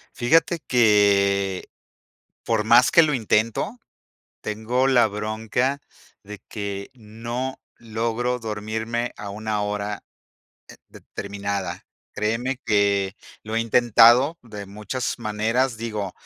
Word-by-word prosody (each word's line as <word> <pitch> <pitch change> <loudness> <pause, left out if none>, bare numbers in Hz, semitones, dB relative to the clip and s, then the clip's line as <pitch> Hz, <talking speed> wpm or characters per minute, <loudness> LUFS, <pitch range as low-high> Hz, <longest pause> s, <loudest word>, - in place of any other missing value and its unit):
Fíjate 165 +6 +2
que, 100 -4 +3 0.8
por 110 -2 0
más 120 +3 +6
que 170 -3 +7
lo 155 -2 +2
intento, 115 - 0 0.6
tengo 115 +5 -1
la 125 -4 +5
bronca 110 +6 -2 0.4
de 105 0 -9
que 100 -2 -5
no 120 +3 -6 0.2
logro 115 +2 -2
dormirme 110 +2 -3
a 100 -1 -6
una 105 0 -3
hora, 105 0 -3 0.7
eh, - - -13
determinada. 100 -2 -5 0.3
Créeme 120 +5 -1
que 100 -1 +2 0.3
lo 110 +1 -4
he 115 - +2
intentado 120 +5 +5
de 105 -4 -9
muchas 105 +6 -4
maneras, 115 +3 0
digo, 105 -4 -4
110 Hz, 105 wpm, -23 LUFS, 105-120 Hz, 0.8 s, que